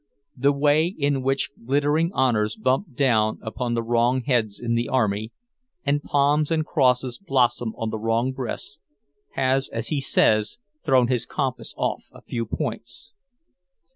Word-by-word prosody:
The 140 +2 +3
way 145 +3 +3
in 145 -7 -1
which 135 +1 0
glittering 145 +6 +1
honours 115 - +1
bump 130 - -1
down 110 -6 +2
upon 120 +2 -3
the 115 - -1
wrong 120 +2 +1
heads 115 -6 0
in 120 -1 -2
the 120 +1 0
army, 110 -3 0 0.5
and 145 +1 +1
palms 145 +1 +2
and 160 -2 0
crosses 130 -5 +1
blossom 125 - 0
on 115 -2 -3
the 110 - -4
wrong 115 +3 0
breasts, 130 - -6 0.5
has, 135 0 +1
as 115 0 -3
he 145 -3 0
says, 110 -5 +2 0.3
thrown 130 -4 +4
his 120 -2 -1
compass 130 -3 -3
off - - -2
a - - -16
few 115 -2 -4
points. 120 +6 -5
130 Hz, 150 wpm, -24 LUFS, 115-140 Hz, 0.5 s, thrown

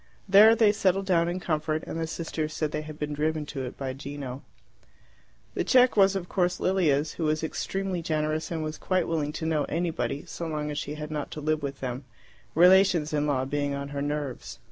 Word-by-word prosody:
There 210 +3 +8
they 220 -2 +5
settled 195 -2 +1
down 170 -3 +2
in 180 +1 -2
comfort, 155 -2 -1
and 165 - -5
the 160 - -2
sisters 160 -1 -4
said 155 -1 -2
they 150 - -2
had 155 0 -9
been 150 0 -3
driven 155 +1 -1
to 140 -2 -5
it 125 - -8
by 135 -1 -3
Gino. 135 -1 -7 1.1
The - - -1
cheque 255 -1 +5
was, 195 -1 +5
of 180 -2 -3
course, 180 -1 0
Lilia's, 155 -6 +2
who 165 - -3
was 155 +1 0
extremely 190 +2 -2
generous, 155 -1 -1
and 160 -2 -3
was 155 0 -5
quite 185 -1 0
willing 155 -3 -1
to 160 - -4
know 155 -2 +1
anybody 160 -6 -2
so 170 - -6
long 150 -1 -3
as 145 - -3
she 145 0 -5
had 150 0 -6
not 150 -2 -3
to - - -6
live 155 +1 0
with 140 -1 -5
them, 130 +1 -4 0.5
relations 180 -2 +5
in 150 0 +1
law 130 -3 +1
being 145 0 -1
on 140 0 -5
her 140 0 -4
nerves. 145 -3 -4
155 Hz, 210 wpm, -27 LUFS, 145-175 Hz, 1.1 s, There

